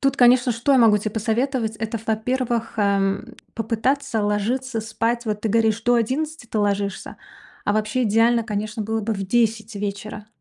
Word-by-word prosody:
Тут, 275 0 +1
конечно, 245 0 +5
что 240 +4 +1
я 265 - +5
могу 220 -3 +6
тебе 210 +1 -4
посоветовать- 225 +1 -1
это, 220 +1 -4
во-первых, 230 +1 -1
эм, 200 +3 0 0.2
попытаться 230 +2 -1
ложиться 225 +4 -1
спать. 230 +2 -2
Вот 210 -1 -2
ты 220 - 0
говоришь: 225 0 +2
"До 245 +1 +3
11 275 +5 -1
ты 220 - -3
ложишься", 200 -1 -1 0.5
а 205 - +1
вообще 215 +4 0
идеально, 230 +1 +3
конечно, 215 0 -3
было 220 +1 -2
бы 220 +1 -2
в 195 -1 -3
10 220 0 0
вечера, 205 +1 -5
225 Hz, 165 wpm, -22 LUFS, 210-240 Hz, 0.5 s, могу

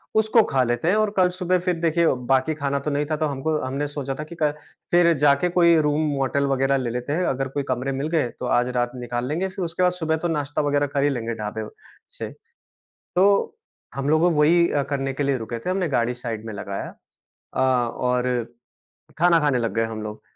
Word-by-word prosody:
उसको 220 +1 +4
खा 130 - +3
लेते 120 +5 -1
हैं 205 - +3
और 215 -1 +2
कल 180 -1 +5
सुबह 180 0 +1
फिर 180 0 0
देखिए 170 0 +2 0.2
बाकी 135 +4 +2
खाना 140 -1 -1
तो 150 +2 -3
नहीं 145 +1 0
था 155 - +2
तो - - +3
हमको 145 +2 -1
हमने 140 +3 -2
सोचा 140 -2 -4
था 150 - -2
कि 160 +2 -10
कल 155 -3 +1 0.4
फिर 175 -1 +5
जाके 140 +5 +4
कोई 170 -1 +5
रूम 150 +1 +1
होटल 140 +1 +1
वग़ैरह 135 0 +2
ले 125 -3 -2
लेते 125 +4 -3
हैं, 180 +3 0
अगर 135 -2 -1
कोई 140 +2 -3
कमरे 130 +1 -1
मिल 135 +2 -2
गए 135 -7 +1
तो - - -4
आज 125 - 0
रात 120 0 0
निकाल 120 0 -3
लेंगे, 165 +7 -1
फिर 185 -1 -4
उसके 165 +2 -2
बाद 180 - +4
सुबह 160 -2 -1
तो 175 - -2
नाश्ता 145 -3 -1
वग़ैरह 145 0 +1
कर 140 0 +1
ही 145 - +3
लेंगे 115 -3 -3
ढाबे 105 -1 -4
व - - -9 0.5
से। - - -4 0.9
तो 200 - +3 0.4
हम 135 +1 -3
लोगों 155 +3 +4
वही 170 +3 +4
अ, 145 - +1
करने 135 -1 -2
के 140 - -2
लिए 140 -1 +1
रुके 115 +1 -5
थे, 150 +11 -4
हमने 185 -2 0
गाड़ी 120 -3 0
साइड 115 -3 -5
में 110 - -5
लगाया। 100 0 -5 0.7
अ, - - -1
और 125 -1 +1 0.9
खाना 170 0 +5
खाने 145 -4 +2
लग 115 - -2
गए 115 0 +2
हम 110 -1 -6
लोग 105 0 -7
145 Hz, 225 wpm, -23 LUFS, 125-165 Hz, 0.9 s, कल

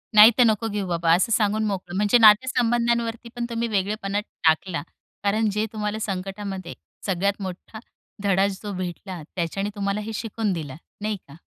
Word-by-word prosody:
नाही 215 +3 +10
तर, 250 - +7
नको 225 0 +2
घेऊ 205 -2 -3
बाबा. 170 -1 +2
असं 190 +5 +1
सांगून 215 0 +2
मोकळं. 190 -2 -4
म्हणजे 210 +4 +4
नातेसंबंधांवरती 235 +1 +3
पण 240 -1 -2
तुम्ही 235 0 -1
वेगळेपण 200 -1 -2 0.3
टाकला. 165 +1 +2 0.4
कारण 215 +2 +2
जे 210 +2 0
तुम्हाला 210 0 -2
संकटामध्ये 195 -2 -4 0.3
सगळ्यात 200 +1 0
मोठा 190 +3 -7 0.4
धडाच 195 0 +3
जो 205 - -4
भेटला, 180 -1 -5
त्याच्याने 190 +4 -2
तुम्हाला 200 +1 -1
हे 220 +1 -6
शिकून 220 -3 -2
दिलं, 150 -5 -5 0.3
नाही 210 -1 -1
का. 140 - -13
205 Hz, 155 wpm, -24 LUFS, 190-220 Hz, 0.4 s, नाही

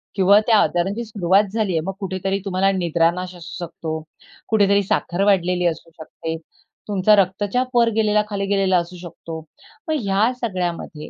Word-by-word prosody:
किंवा 200 +1 +5
त्या 220 -2 +5
आजारांची 195 +6 0
सुरुवात 200 -2 +2
झाली 215 -5 0
आहे. 160 - +1
मग 195 - -2
कुठेतरी 195 0 -2
तुम्हाला 195 +1 +1
निद्रानाश 175 +1 0
असू 175 +1 -7
शकतो, 160 -1 -5 0.5
कुठेतरी 200 -2 +3
साखर 185 0 -1
वाढलेली 180 -3 +2
असू 165 0 -4
शकते, 160 +1 -6 0.5
तुमचा 205 +1 +4
रक्तचाप 205 +6 0
वर 235 -1 +5
गेलेला, 210 -1 +3
खाली 200 -1 -2
गेलेला 195 -2 +2
असू 175 +1 -3
शकतो. 165 -2 -8 0.5
मग 315 - 0
ह्या 200 +3 +2
सगळ्यामध्ये 175 -7 -4
190 Hz, 150 wpm, -21 LUFS, 175-205 Hz, 0.5 s, किंवा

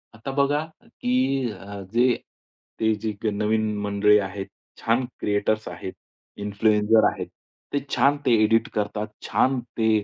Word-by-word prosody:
आता 125 +5 -6
बघा 145 +2 +2 0.2
की 245 +2 -2 0.4
अ, 100 +1 -8
जे 125 +1 +4 0.6
ते 110 -1 +3
जे 105 +1 -3 0.2
नवीन 105 +1 0
मंडळी 105 +1 +4
आहेत, 95 0 -4 0.3
छान 120 +3 +2
क्रिएटर्स 105 +1 0
आहेत, 90 +1 -6 0.5
इन्फ्लुएन्सर 105 +1 +3
आहेत, - - -6 0.5
ते 145 - +2 0.2
छान 145 +1 +4
ते 125 - +3
एडिट 115 +1 +3
करतात. 105 +1 -2 0.2
छान 130 -1 +2 0.2
ते 110 -1 +2
110 Hz, 130 wpm, -24 LUFS, 105-120 Hz, 0.6 s, जे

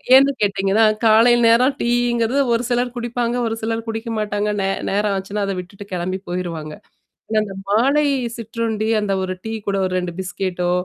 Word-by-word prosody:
ஏன்னு 275 +1 +6
கேட்டீங்கனா, 195 +1 +2 0.2
காலை 225 +2 +6
நேரம் 250 +4 +5
டீங்குறது 240 +2 +1
ஒரு 230 +1 +1
சிலர் 245 0 0
குடிப்பாங்க. 240 0 -2
ஒரு 225 - -2
சிலர் 225 0 -2
குடிக்க 225 +1 -4
மாட்டாங்க. 210 -1 -1
நே 195 - 0 0.2
நேரம் 205 +1 +1
ஆச்சுனா, 200 +2 -3
அதை 195 -1 -2
விட்டுவிட்டுப் 200 +2 -10
கிளம்பிப் 185 +2 -3
போய்ருவாங்க. 165 -4 -4 0.6
ஆனா 220 - +3
அந்த 195 -2 -7
மாலை 275 +8 +3 0.3
சிற்றுண்டி, 225 -1 -2
அந்த 200 -1 -1
ஒரு 185 0 -3
டீ 220 - -3 0.2
கூட 195 -1 0
ஒரு 185 0 -1 0.2
பிஸ்கேட்டோ 180 -1 -2
215 Hz, 160 wpm, -20 LUFS, 195-235 Hz, 0.6 s, ஏன்னு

